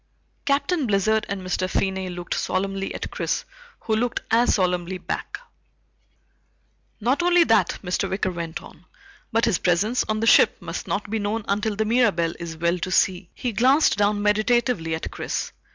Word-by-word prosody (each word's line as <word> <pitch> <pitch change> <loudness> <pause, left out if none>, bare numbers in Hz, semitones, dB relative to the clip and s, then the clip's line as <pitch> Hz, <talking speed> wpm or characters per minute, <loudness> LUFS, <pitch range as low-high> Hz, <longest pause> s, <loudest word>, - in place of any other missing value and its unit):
Captain 285 +1 +1
Blizzard 215 +2 +1
and 195 -1 -4
Mr. 185 0 -1
Finney 190 -1 -1
looked 175 -1 -5
solemnly 195 0 -2
at - - -5
Chris - - -2 0.4
who 220 - 0
looked 235 +2 0
as 235 +2 +4
solemnly 180 -1 0
back. 180 - -5 1.6
"Not 250 +8 +1
only 350 0 +5
that," 225 -8 +2
Mr. 180 -1 -1
Wicker 190 0 -1
went 170 -2 -5
on, 175 - -15 0.5
"but 230 0 +2
his 225 -7 +1
presence 200 +8 +1
on 215 0 -1
the 225 - 0
ship - - +5
must - - -6
not 205 0 -3
be 225 - 0
known 210 +1 -2
until 205 +1 0
the 220 +1 0
Mirabelle 210 -8 +2
is 165 -1 -6
well 170 +2 0
to 185 - -3
sea." 185 -1 +1
He 245 - -3
glanced 260 +8 +4
down 205 0 +1
meditatively 210 -5 +1
at 160 - -6
Chris. - - -4
205 Hz, 170 wpm, -23 LUFS, 185-230 Hz, 1.6 s, only